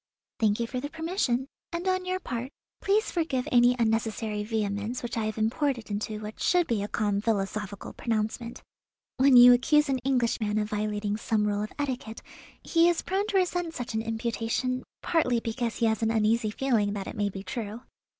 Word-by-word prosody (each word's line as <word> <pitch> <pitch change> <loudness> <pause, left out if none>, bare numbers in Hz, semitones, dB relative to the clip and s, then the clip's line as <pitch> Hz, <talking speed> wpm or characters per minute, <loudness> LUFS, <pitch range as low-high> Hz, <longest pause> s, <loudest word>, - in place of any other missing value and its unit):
"Thank 215 -2 +2
you 235 - 0
for 250 +2 -4
the 290 +3 -5
permission, 320 -6 -1 0.3
and 345 +2 -3
on 370 0 +1
your 370 0 -1
part 250 -6 -4 0.3
please 415 +3 +2
forgive 310 -7 -1
any 245 0 +5
unnecessary 220 -2 0
vehemence 210 +2 -2
which 240 - -4
I 225 -2 -1
have 215 0 -3
imported 235 +1 -1
into 210 +1 -3
what 215 0 -8
should 355 -1 +3
be 230 -7 0
a 205 - -2
calm 205 -2 0
philosophical 205 -2 -2
pronouncement. 230 +1 -3 0.5
When 265 -1 +6
you 245 0 +10
accuse 295 +4 +3
an 265 -1 +1
Englishman 235 -4 0
of 210 0 -1
violating 210 0 -1
some 215 -1 0
rule 205 0 0
of 215 - -5
etiquette, 260 -6 -4 0.4
he 335 0 +4
is 345 - 0
prone 390 +2 -1
to 405 - +1
resent 355 -2 0
such 245 -1 -5
an 220 - 0
imputation, 230 +3 -2 0.2
partly 255 -8 +2
because 230 0 -3
he 235 - +1
has 220 0 +1
an 225 - +2
uneasy 225 0 +2
feeling 215 -3 +1
that 200 -2 -4
it - - -7
may 205 -2 0
be 195 0 -7
true. 215 +3 -5
230 Hz, 190 wpm, -28 LUFS, 215-265 Hz, 0.5 s, you